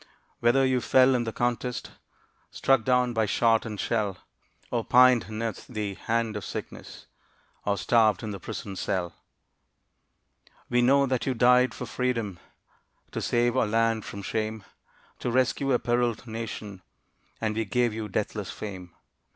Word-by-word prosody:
Whether 125 +3 +4
you 130 -1 +1
fell 130 +2 +5
in 120 -2 0
the 115 - -2
contest, 120 0 -2 0.6
Struck 135 -4 +2
down 125 -1 +2
by 110 -2 +1
shot 115 +3 +2
and 105 -2 -6
shell, 105 -4 -1 0.5
Or 120 -2 0
pined 125 -4 +5
'neath 110 +1 -4
the 105 -4 -3
hand 115 +2 -1
of 105 - -4
sickness - - -8 0.6
Or 100 0 +1
starved 110 +1 +3
in 110 - -4
the 100 - -6
prison 95 +2 -6
cell, 95 -3 -2 1.6
We 120 0 +3
know 140 +3 +4
that 130 -1 -1
you 130 - 0
died 125 +1 +4
for - - -5
Freedom, 115 -8 -2 0.7
To - - -4
save 120 0 +1
our - - +2
land 115 0 +1
from 100 0 -7
shame, 110 0 -3 0.6
To - - -2
rescue 130 +2 +1
a 125 - +4
periled 120 -1 0
Nation, 110 -4 -6 0.6
And 110 -1 -1
we 115 - 0
give 120 +2 +1
you 110 -1 -5
deathless 105 0 -3
fame. 95 -5 -8
115 Hz, 150 wpm, -27 LUFS, 105-125 Hz, 1.6 s, fell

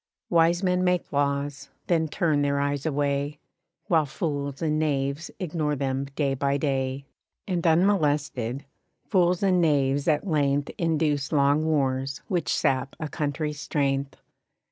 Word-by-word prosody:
Wise 170 +2 +3
men 180 -1 +2
make 180 -1 0
laws, 140 0 -1 0.2
then 165 -2 +1
turn 155 -2 +1
their 140 0 +1
eyes 145 +1 -1
away, 145 0 -1 0.5
While 160 -4 +2
fools 140 -2 -3
and 155 -2 0
knaves 140 0 -1
ignore 155 -5 -1
them 135 0 -1
day 140 -2 +1
by 140 +1 0
day; 135 -1 -1 0.4
And 180 -3 -1
unmolested, 145 - +1 0.4
fools 180 -2 +2
and 185 -2 +3
knaves 140 -3 +2
at 155 +3 +2
length 145 -4 +1
Induce 155 -4 0
long 145 +1 +3
wars 135 -3 0
which 180 -4 -1
sap 135 0 0
a 155 - -3
country's 150 0 -3
strength. 140 -2 -1
145 Hz, 135 wpm, -26 LUFS, 140-165 Hz, 0.5 s, Wise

